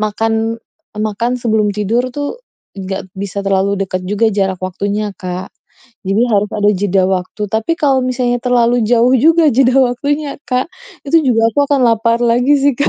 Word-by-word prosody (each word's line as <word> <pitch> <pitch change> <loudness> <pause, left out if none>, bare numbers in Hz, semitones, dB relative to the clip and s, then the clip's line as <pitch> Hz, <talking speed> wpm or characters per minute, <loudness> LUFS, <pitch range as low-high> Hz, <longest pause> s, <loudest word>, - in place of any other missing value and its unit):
makan, 225 +1 -1 0.4
makan 215 +3 -1
sebelum 220 -3 0
tidur 230 +5 0
tuh, 290 +11 -4 0.3
nggak 190 -1 -6
bisa 200 0 -4
terlalu 195 0 +1
deket 185 -1 -4
juga 210 +3 +1
jarak 195 -2 -1
waktunya, 200 +3 -2
Kak, 185 0 -6 0.6
jadi 200 +4 +1
harus 205 0 +2
ada 205 -1 +2
jeda 195 -1 +1
waktu. 185 +3 -3
Tapi 220 +9 0
kalau 275 -5 +2
misalnya 250 -1 -1
terlalu 245 -1 +2
jauh 240 +2 +3
juga 320 +3 +4
jeda 255 +1 +3
waktunya, 285 +4 -2
Kak, 255 +6 -1 0.3
itu 300 +3 +3
juga 230 -5 +2
aku 230 - -5
akan 285 -2 +2
lapar 230 0 +2
lagi 245 +4 +3
sih, 280 0 +2
Kak. 285 - +2
225 Hz, 165 wpm, -15 LUFS, 200-250 Hz, 0.6 s, juga